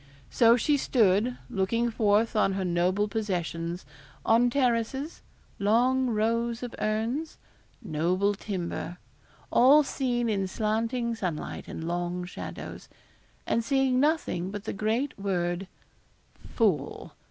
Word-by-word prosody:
So 235 0 +5
she 290 +5 +2
stood, 230 -2 +2
looking 230 +2 0
forth 220 +1 +2
on 195 -2 +3
her 190 -1 -2
noble 180 +4 +1
possessions 180 -5 -3 0.4
on 235 +2 +4
terraces 255 +3 0 0.4
'long 245 +5 +3
rows 230 +2 0
of 245 - -5
urns' 230 +9 -2 0.5
noble 185 +3 +1
timber 180 -4 -4 0.5
all 280 +5 +6
seen 245 -4 -1
in 195 -3 0
slanting 230 +4 -1
sunlight 180 -8 -4
and 165 - -6
long 175 +1 -2
shadows 180 - -8 0.6
and 230 - +1
seeing 270 0 +2
nothing 285 - +1
but 205 0 -6
the - - -4
great 225 +7 -1
word 180 -1 -1 0.9
FOOL! 180 - 0
220 Hz, 115 wpm, -28 LUFS, 185-240 Hz, 0.9 s, all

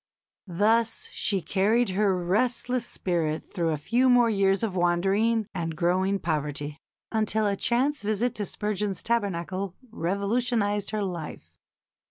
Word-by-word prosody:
Thus 220 +6 +1
she 195 -4 0
carried 215 +4 +2
her 195 0 +2
restless 240 +6 0
spirit 165 -4 -2
through 170 -4 -2
a 155 - 0
few 240 - +2
more 245 -2 +5
years 195 0 +2
of 205 -5 -1
wandering 195 +6 +2
and 165 -3 -3
growing 185 +3 +1
poverty, 150 -3 -3 0.3
until 220 -1 +1
a 200 -1 +1
chance 260 +8 +1
visit 215 +3 0
to 205 -2 -4
Spurgeon's 210 -3 -2
Tabernacle 195 -4 -2 0.2
revolutionised 205 +2 0
her 215 -1 -1
life. 175 -5 -6
200 Hz, 130 wpm, -26 LUFS, 175-225 Hz, 0.3 s, more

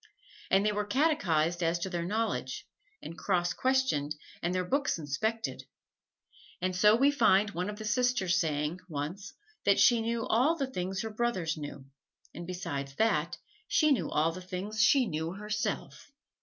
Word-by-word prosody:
And 195 +2 +3
they 210 - +3
were 210 0 -2
catechized 180 - +1
as 165 0 +1
to 170 - -3
their 175 -2 -2
knowledge, 220 +5 -2 0.4
and 165 - -7
cross 175 -2 0
questioned 255 - +1 0.3
and 175 - -1
their 185 0 0
books 275 +3 0
inspected; 215 - -2 1.0
and 185 0 -1
so 210 +4 +6
we 275 +5 +4
find 210 -6 +3
one 180 +3 -3
of 210 - -6
the 215 - -7
sisters 215 -6 +2
saying, 155 0 -1
once, 155 +6 -5 0.3
that 200 - +4
she 240 -3 +5
knew 230 0 -1
all 260 +9 +3
the 285 -4 -1
things 190 -1 -3
her 220 - -4
brothers 210 -8 -1
knew, 145 -3 -8 0.5
and 170 +1 -8
besides 140 -7 -4
that 175 -6 +1 0.3
she 305 -1 +3
knew 275 - +1
all 160 +2 +2
the 185 +3 -8
things 190 +4 -3
she 255 +4 +5
knew 160 -3 -3
herself. 210 +6 -4
190 Hz, 165 wpm, -30 LUFS, 170-225 Hz, 1.0 s, so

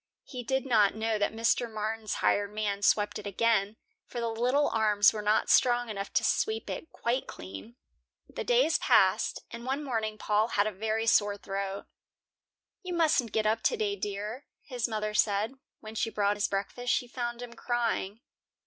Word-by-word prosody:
He 250 -3 -7
did 265 +2 -1
not 215 -6 +3
know 220 0 -1
that 205 - +1
Mr. 230 +1 +1
Martin's 215 0 -3
hired 205 0 +2
man 210 -1 -2
swept 210 0 +2
it 210 - -7
again, 210 0 +1 0.3
for 240 - -6
the 235 -1 -1
little 250 +6 +2
arms 210 -2 +4
were 215 - -4
not 210 +1 +2
strong 245 -1 +3
enough 200 -1 -5
to - - +2
sweep 440 +1 0
it 320 - -6
quite 245 +3 -2
clean. 95 +5 -9 0.5
The - - -6
days 260 +7 +3
passed, - - +3
and 235 0 -7
one 270 +4 -2
morning 220 -5 -2
Paul 215 +1 +1
had 205 -3 +1
a 215 - -1
very 220 +3 -2
sore 205 -2 +3
throat. 195 0 -4 1.0
"You 365 -3 -4
mustn't 300 -9 +2
get 220 -1 0
up 220 +1 +1
today, 430 -4 0
dear," 210 - -5 0.2
his 250 -4 -3
mother 215 -2 -3
said. 210 +2 +1 0.3
When 215 0 -9
she 225 +1 -1
brought 205 -2 +1
his 205 - +1
breakfast, 205 +5 -2
she 245 - 0
found 240 0 -4
him 240 -1 -9
crying. 230 -4 -2
220 Hz, 175 wpm, -29 LUFS, 205-245 Hz, 1.0 s, arms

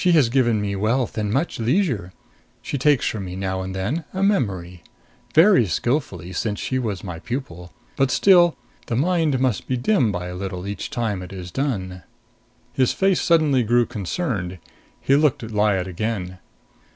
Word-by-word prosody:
She 180 -2 +4
has 145 -8 +4
given 120 -3 +2
me 100 -1 -2
wealth 115 +5 0
and 105 -2 -1
much 140 +6 -1
leisure. 115 - 0 0.5
She 140 - -3
takes 145 -1 +3
from 105 -3 -3
me 90 0 -6
now 95 0 -2
and 95 0 -5
then 120 - -2
a 190 - 0
memory. 95 - 0 0.5
Very 165 - +6
skillfully, 95 - -2
since 105 +2 -2
she 130 - -1
was 105 -7 -3
my 90 -4 -6
pupil. 90 - -6 0.3
But 135 -1 +2
still 175 +1 +5 0.3
the 115 - -1
mind 155 -1 +1
must 125 -7 0
be 130 - 0
dim 125 - +2
by 90 -2 -4
a 90 - -6
little 95 -1 -5
each 100 -1 -5
time 110 -6 -2
it 90 - -9
is 90 -2 -8
done." 95 -8 -3 0.7
His 130 -2 +2
face 195 -1 +2
suddenly 155 -6 +3
grew 120 +1 +3
concerned. 100 - -3 0.4
He 135 - +2
looked 145 -4 +2
at 110 - -7
Lyad 105 -3 +1
again. 95 -1 -4
115 Hz, 175 wpm, -22 LUFS, 95-140 Hz, 0.7 s, Very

